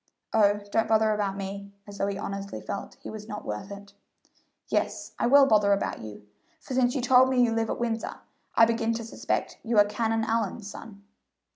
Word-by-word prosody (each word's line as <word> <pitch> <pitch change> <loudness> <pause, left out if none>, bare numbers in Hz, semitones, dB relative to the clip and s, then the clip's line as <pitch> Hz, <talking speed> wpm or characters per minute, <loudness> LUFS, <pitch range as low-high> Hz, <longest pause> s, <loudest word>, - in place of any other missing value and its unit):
"Oh, 205 -2 +4
don't 225 - +2
bother 220 -1 +3
about 200 -2 -1
me," 200 0 -6
as 200 -1 -11
though 195 - +1
he 200 -1 -2
honestly 200 0 -5
felt 200 - -6
he - - -7
was 215 -1 -8
not 210 -1 -7
worth 105 - -5
it. 200 0 -10 0.7
"Yes, - - -1
I - - +2
will 280 +2 +7
bother 210 -4 +4
about 200 - -2
you, 105 -1 -10 0.3
for - - -8
since 250 0 +2
you 265 - 0
told 255 +1 +5
me 260 -1 +1
you 230 -2 +2
live 225 0 0
at - - -2
Windsor, 230 -1 -2 0.4
I 225 - +7
begin 230 0 0
to 230 - -4
suspect 225 - -3
you 230 -1 -1
are 205 - +8
Canon 225 +1 -1
Allyn's 220 -2 -2
son." 205 -3 -11
215 Hz, 200 wpm, -27 LUFS, 200-230 Hz, 0.7 s, are